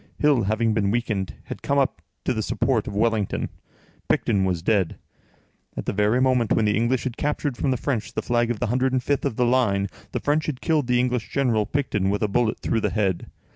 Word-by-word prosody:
Hill, 145 -8 +3
having 110 +2 +1
been 105 -2 +1
weakened, 110 -4 -1
had - - -8
come 140 - 0
up 135 -2 +1 0.2
to 130 - +1
the 110 - -1
support 115 +1 0
of 105 - -5
Wellington; 110 -2 0 0.6
Picton 100 -4 +2
was 90 -3 -1
dead. 95 -4 +1 0.8
At - - -3
the - - -1
very 105 +4 +2
moment 130 -4 +2
when 110 - +2
the 105 - +2
English 120 +2 +1
had 130 -2 -4
captured 145 -2 -1
from 135 - -1
the 130 - +1
French 115 -5 -2
the - - -2
flag 120 -1 +1
of 120 - -1
the - - 0
105th 130 +3 0
of - - -1
the 125 - +2
line, 105 -6 +2 0.2
the - - -2
French 150 +2 0
had 140 -5 -3
killed 155 -6 +1
the 125 -1 +3
English 125 -3 0
general, 115 -6 +1
Picton, 105 -9 0
with 105 +2 0
a - - +3
bullet 110 +2 +1
through 115 - 0
the - - +1
head. 95 -5 -1
115 Hz, 215 wpm, -24 LUFS, 105-130 Hz, 0.8 s, Hill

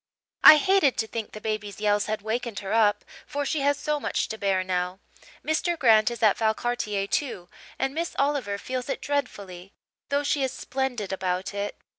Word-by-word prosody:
I 305 - +11
hated 375 -6 +3
to 220 - 0
think 225 -1 -5
the 215 - -8
baby's 210 -2 -4
yells 205 -1 +1
had 215 -1 -3
wakened 225 0 -3
her 195 +1 -4
up, 210 -2 +3 0.2
for 285 0 -3
she 310 - -1
has 285 +1 +2
so 300 +1 -1
much - - -2
to 220 - -5
bear 195 -2 +1
now. 180 0 -2 0.5
Mr. 335 +2 0
Grant 225 -5 +5
is 235 -1 -6
at 210 -2 +4
Valcartier, 220 -2 -1
too, 200 -6 -3 0.3
and 270 0 -1
Miss 335 +3 -3
Oliver 275 -8 0
feels 255 +5 -5
it - - -2
dreadfully, 200 -10 -4 0.4
though 285 0 +1
she 285 0 0
is 265 -1 0
splendid 250 -7 -3
about 185 0 -2
it. 200 0 -4
220 Hz, 185 wpm, -26 LUFS, 200-280 Hz, 0.5 s, I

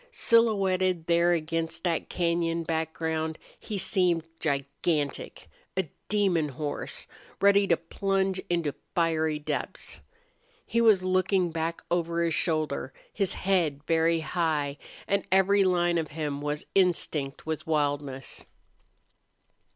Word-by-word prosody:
Silhouetted 190 - +2
there 170 +1 +3
against 165 0 -2
that 170 -3 -1
cañon 170 -1 0
background 160 0 -2 0.2
he 210 - -5
seemed 180 -4 +2 0.2
gigantic, 140 0 -2 0.3
a 190 -3 +1 0.2
demon 190 -7 +2
horse, 145 +1 -3 0.3
ready 200 0 +5
to 170 - +3
plunge 190 +2 -1
into 170 -5 0 0.2
fiery 160 -2 +1
depths. 150 - -4 0.6
He 235 +1 +1
was 215 -5 +5
looking 185 -1 +2
back 165 +1 -3
over 170 -1 +1
his 165 -1 +1
shoulder, 155 -6 0 0.2
his 195 -3 0
head 170 -7 0
very 165 0 +2
high, 155 -4 -1 0.3
and 200 - +1
every 195 +1 +5
line 175 -2 +2
of 160 - -2
him 145 -2 -2
was 150 +1 -3
instinct 160 -7 +1
with 160 0 -4
wildness. 145 -4 -2
165 Hz, 115 wpm, -28 LUFS, 155-185 Hz, 0.6 s, ready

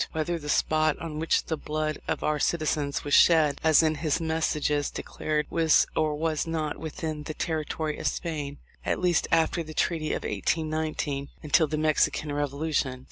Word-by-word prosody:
Whether 165 +2 -1
the 150 -1 -7
spot 155 0 +2
on 155 -2 -6
which 160 - +2
the 160 - -2
blood 155 0 -3
of - - -2
our 150 -1 +1
citizens 150 -3 0
was 145 - -3
shed 155 -4 +5
as 160 0 +6
in 155 -1 +3
his 155 0 +1
messages 155 -3 0
declared 150 -1 -2
was 165 -2 +4
or 155 -1 +1
was 155 +1 -1
not 155 -2 -2
within 155 0 -4
the 150 +1 -6
territory 155 -1 -2
of - - -1
Spain, 150 -4 -3 0.3
at - - 0
least 180 -2 +2
after 165 +1 +2
the 155 -1 -8
treaty 155 -2 0
of - - -3
1819, 155 -3 -2
until 155 +1 +3
the 155 +1 -2
Mexican 155 -1 +1
revolution. 145 -2 -1
155 Hz, 170 wpm, -27 LUFS, 150-160 Hz, 0.3 s, as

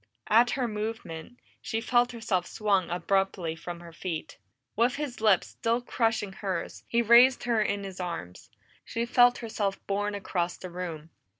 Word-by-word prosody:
At 235 +3 +6
her 250 -2 0
movement, 210 -2 -5 0.2
she 225 - -2
felt 245 +1 +2
herself 220 -7 -1
swung 200 -4 +1
abruptly 180 -1 0
from 170 +1 -7
her 170 -1 -12
feet. 165 - -5 0.4
With 235 +3 +2
his 280 -6 -5
lips 210 -5 +4
still 230 +1 0
crushing 225 -4 -1
hers, 185 -3 -4
he 235 0 +2
raised 240 +3 +6
her 235 -3 +2
in 200 -1 -1
his 190 -1 -7
arms; 130 - -6 0.3
she 230 +1 -2
felt 245 +1 +5
herself 215 -4 -2
borne 205 +1 -1
across 180 -3 -2
the 185 - -8
room. 165 -3 -6
205 Hz, 160 wpm, -28 LUFS, 180-235 Hz, 0.4 s, At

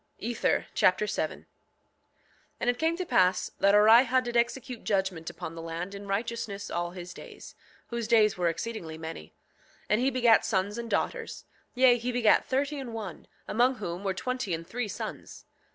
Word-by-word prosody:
Ether 235 +2 0
Chapter 185 +3 +3
7 210 - -3
7:1 - - -27 1.1
And 245 - +2
it 245 - -10
came 325 +1 +1
to 365 - -3
pass 185 - +2
that 200 +1 +5
Orihah 235 +4 +6
did 240 -1 -5
execute 240 +1 -1
judgment 190 -5 -1
upon 160 - -7
the 165 - -7
land 165 +4 -5
in 200 0 -8
righteousness 205 0 -3
all 175 0 -1
his 180 0 -9
days, - - -11 0.4
whose 235 -2 -3
days 220 -3 +4
were 180 -2 0
exceedingly 165 -3 -5
many. 160 - -7 0.6
7:2 - - -29
And 210 +3 +3
he 260 - +3
begat 240 -3 +4
sons 205 +1 -1
and 235 -1 -5
daughters; 465 - -2 0.3
yea, 250 -1 +5
he 245 +2 -2
begat 240 -3 +3
thirty 280 +2 -1
and 240 -4 -6
one, 205 -7 -7 0.2
among 250 +4 +2
whom 185 -4 -5
were 190 -2 -1
twenty 250 -4 -2
and 165 +1 -8
three 245 +4 -3
sons. - - -7
220 Hz, 180 wpm, -28 LUFS, 185-245 Hz, 1.1 s, Orihah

